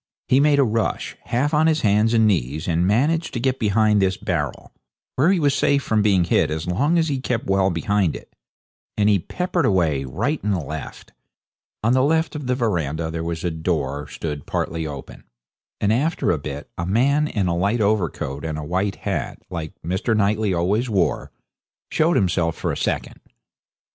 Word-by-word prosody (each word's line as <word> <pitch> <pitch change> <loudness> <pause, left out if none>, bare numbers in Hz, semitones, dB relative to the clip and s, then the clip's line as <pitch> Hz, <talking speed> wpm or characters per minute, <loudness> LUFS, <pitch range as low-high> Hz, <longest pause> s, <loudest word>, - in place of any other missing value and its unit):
He 130 - +4
made 145 0 +4
a 140 - +5
rush, 115 -2 -1
half 140 +6 0
on 155 +1 +4
his 155 -1 +2
hands 105 +2 +3
and 110 -1 +4
knees, 80 - 0
and 85 +1 +1
managed 150 - +1
to - - -1
get 130 +1 0
behind 105 -1 +3
this 95 0 +1
barrel, - - -3 0.4
where 155 +8 +4
he 190 - +2
was 145 -3 +2
safe 140 0 +2
from 110 -1 +1
being 100 -4 +3
hit 85 - +2
as 80 +1 -3
long 140 - +1
as 165 -1 +2
he 140 -3 -1
kept 125 -3 -2
well 95 0 +2
behind 95 0 0
it. - - -12 0.6
Then 105 -1 +3
he 100 -2 +4
peppered 180 - -2
away, 85 - +2
right 110 - -2
and 100 -2 +1
left. 80 -1 -7 0.7
On 115 +3 +3
the 130 - +4
left 160 +4 +1
of 145 -3 -5
the 125 - +1
verandah 85 - -1
there 80 0 -4
was 85 0 -4
a 90 - 0
door 75 -3 -2
stood 75 -3 -6
partly 80 -1 -2
open, 70 -3 -9 0.6
and 105 +1 +2
after 150 +8 +1
a 80 - 0
bit 70 0 -6
a 85 - -2
man 140 +9 +2
in 105 -9 -1
a 85 -1 0
light 100 +7 +1
overcoat 90 -10 -1
and 80 -1 -3
a 75 - -5
white 95 +4 -1
hat, - - -3
like 80 -3 -6
Mr. 95 +6 0
Knightley 105 0 +1
always 100 +8 0
wore, 95 -5 0 0.6
showed 165 +2 +2
himself 85 -3 +1
for - - -2
a - - -3
second. - - -3
100 Hz, 190 wpm, -22 LUFS, 85-125 Hz, 0.7 s, a